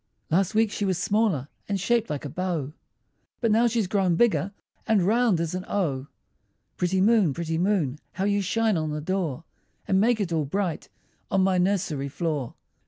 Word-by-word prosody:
Last 190 Hz, +5 st, +2 dB
week 220 Hz, -1 st, +3 dB
she 210 Hz, -, -3 dB
was 190 Hz, -3 st, +1 dB
smaller, 195 Hz, -, +1 dB, 0.2 s
And 200 Hz, -1 st, 0 dB
shaped 230 Hz, +3 st, +1 dB
like 150 Hz, 0 st, -4 dB
a -, -, -4 dB
bow; 165 Hz, -3 st, -3 dB, 0.7 s
But 230 Hz, -3 st, +1 dB
now 230 Hz, +3 st, +4 dB
she's 230 Hz, -2 st, +1 dB
grown 185 Hz, -2 st, +1 dB
bigger, 200 Hz, -1 st, +2 dB, 0.4 s
And 210 Hz, -4 st, +3 dB
round 220 Hz, -1 st, +3 dB
as 170 Hz, 0 st, -2 dB
an 185 Hz, 0 st, -3 dB
O. 145 Hz, -9 st, -1 dB, 0.7 s
Pretty 180 Hz, +1 st, 0 dB
moon, 200 Hz, -, +4 dB
pretty 165 Hz, -1 st, -2 dB
moon, 170 Hz, -8 st, +1 dB
How 190 Hz, -, -3 dB
you 200 Hz, 0 st, +2 dB
shine 215 Hz, +1 st, +1 dB
on 155 Hz, -1 st, -1 dB
the 150 Hz, 0 st, -3 dB
door, 165 Hz, -3 st, -2 dB, 0.4 s
And 190 Hz, 0 st, +3 dB
make 230 Hz, +1 st, +3 dB
it 185 Hz, -5 st, -1 dB
all 155 Hz, -2 st, +1 dB
bright 180 Hz, +2 st, -2 dB, 0.4 s
On 195 Hz, -, +2 dB
my 185 Hz, -1 st, +2 dB
nursery 180 Hz, -7 st, 0 dB
floor! 150 Hz, -5 st, -3 dB
185 Hz, 180 wpm, -26 LUFS, 160-205 Hz, 0.7 s, now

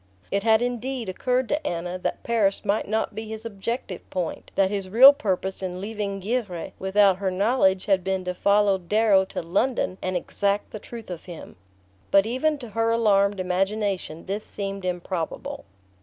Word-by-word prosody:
It 200 Hz, -, +1 dB
had 220 Hz, +2 st, +4 dB
indeed 245 Hz, -2 st, -3 dB
occurred 250 Hz, +6 st, 0 dB
to 295 Hz, 0 st, -1 dB
Anna 175 Hz, +2 st, -3 dB
that -, -, -3 dB
Paris 215 Hz, -5 st, +1 dB
might 205 Hz, +1 st, 0 dB
not 220 Hz, +1 st, -1 dB
be 220 Hz, +1 st, -6 dB
his 220 Hz, +1 st, -7 dB
objective 205 Hz, -2 st, -4 dB
point: 180 Hz, -3 st, -4 dB
that 195 Hz, 0 st, +3 dB
his 195 Hz, -2 st, -3 dB
real 260 Hz, +8 st, +9 dB
purpose 190 Hz, -8 st, -2 dB
in 185 Hz, -1 st, -4 dB
leaving 200 Hz, -1 st, -4 dB
Givre 200 Hz, -4 st, -3 dB
without 190 Hz, 0 st, +4 dB
her 195 Hz, -1 st, -1 dB
knowledge 190 Hz, -1 st, +2 dB
had 190 Hz, -3 st, +2 dB
been 190 Hz, 0 st, -1 dB
to 180 Hz, -, -2 dB
follow 200 Hz, +1 st, +3 dB
Darrow 200 Hz, +1 st, +3 dB
to 190 Hz, -, -5 dB
London 195 Hz, +2 st, 0 dB
and 185 Hz, -1 st, -1 dB
exact 200 Hz, +3 st, -1 dB
the 215 Hz, -, -6 dB
truth 230 Hz, -2 st, -9 dB
of 175 Hz, -, -7 dB
him. 175 Hz, -3 st, -10 dB, 0.5 s
But 195 Hz, 0 st, +5 dB
even 260 Hz, +7 st, 0 dB
to 245 Hz, -5 st, -9 dB
her 225 Hz, +2 st, 0 dB
alarmed 205 Hz, -3 st, +3 dB
imagination 190 Hz, -2 st, -1 dB
this 200 Hz, +3 st, -3 dB
seemed 195 Hz, -1 st, -5 dB
improbable. 175 Hz, -2 st, -4 dB
200 Hz, 170 wpm, -25 LUFS, 185-225 Hz, 0.5 s, real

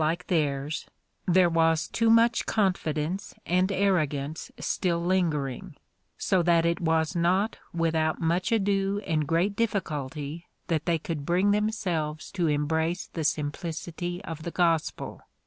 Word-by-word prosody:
121 170 Hz, +2 st, +1 dB
theirs 140 Hz, +1 st, -3 dB, 0.4 s
there 180 Hz, 0 st, +5 dB
was 165 Hz, -1 st, +2 dB
too 230 Hz, -1 st, +1 dB
much 230 Hz, +1 st, +4 dB
confidence 180 Hz, -3 st, -1 dB
and 185 Hz, +2 st, +2 dB
arrogance 155 Hz, -7 st, 0 dB
still 175 Hz, -3 st, 0 dB
lingering, 170 Hz, -2 st, -1 dB, 0.4 s
so 190 Hz, -3 st, +2 dB
that 170 Hz, -1 st, +3 dB
it 170 Hz, +3 st, +1 dB
was 160 Hz, +1 st, +1 dB
not 185 Hz, +5 st, +1 dB
without 160 Hz, -1 st, 0 dB
much 175 Hz, +6 st, 0 dB
ado 200 Hz, -2 st, +1 dB
and 155 Hz, -4 st, 0 dB
great 175 Hz, +5 st, +1 dB
difficulty 155 Hz, -7 st, -3 dB, 0.2 s
that 160 Hz, -1 st, 0 dB
they 170 Hz, -1 st, +3 dB
could 160 Hz, -2 st, -4 dB
bring 180 Hz, +6 st, +2 dB
themselves 185 Hz, -8 st, -1 dB
to 175 Hz, -4 st, 0 dB
embrace 160 Hz, +3 st, 0 dB
the 165 Hz, -, -2 dB
simplicity 170 Hz, +4 st, -3 dB
of 165 Hz, -4 st, -6 dB
the 170 Hz, -, -4 dB
gospel. 165 Hz, -2 st, 0 dB
170 Hz, 130 wpm, -27 LUFS, 155-185 Hz, 0.4 s, there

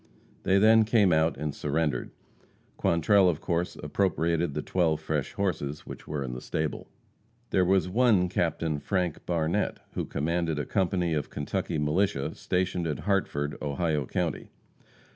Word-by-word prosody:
They 95 Hz, -, +3 dB
then 110 Hz, +2 st, +6 dB
came 105 Hz, -5 st, +4 dB
out 80 Hz, +1 st, +2 dB
and 75 Hz, -1 st, -3 dB
surrendered. 75 Hz, +1 st, -1 dB, 0.7 s
Quantrell, 90 Hz, +3 st, +4 dB
of 80 Hz, -3 st, -1 dB
course, 85 Hz, 0 st, -1 dB
appropriated 85 Hz, -1 st, 0 dB
the -, -, -2 dB
twelve 80 Hz, -4 st, +1 dB
fresh 80 Hz, -2 st, -2 dB
horses 75 Hz, -7 st, -2 dB
which -, -, -9 dB
were 75 Hz, -2 st, -3 dB
in 65 Hz, -2 st, -5 dB
the 60 Hz, -, -6 dB
stable. 80 Hz, -1 st, -3 dB, 0.6 s
There 95 Hz, -, +3 dB
was 95 Hz, 0 st, +3 dB
one 105 Hz, -2 st, +3 dB
Captain 80 Hz, -3 st, -1 dB
Frank 90 Hz, 0 st, -1 dB
Barnette, 85 Hz, -2 st, 0 dB, 0.2 s
who -, -, -2 dB
commanded 80 Hz, +1 st, -1 dB
a 75 Hz, -, -2 dB
company 90 Hz, -3 st, 0 dB
of 75 Hz, -2 st, -2 dB
Kentucky 75 Hz, +1 st, -3 dB
militia 75 Hz, 0 st, 0 dB
stationed 90 Hz, -2 st, -1 dB
at 75 Hz, -, -3 dB
Hartford, 75 Hz, -8 st, 0 dB
Ohio 75 Hz, -1 st, -1 dB
county. -, -, -2 dB
85 Hz, 145 wpm, -28 LUFS, 75-95 Hz, 0.7 s, then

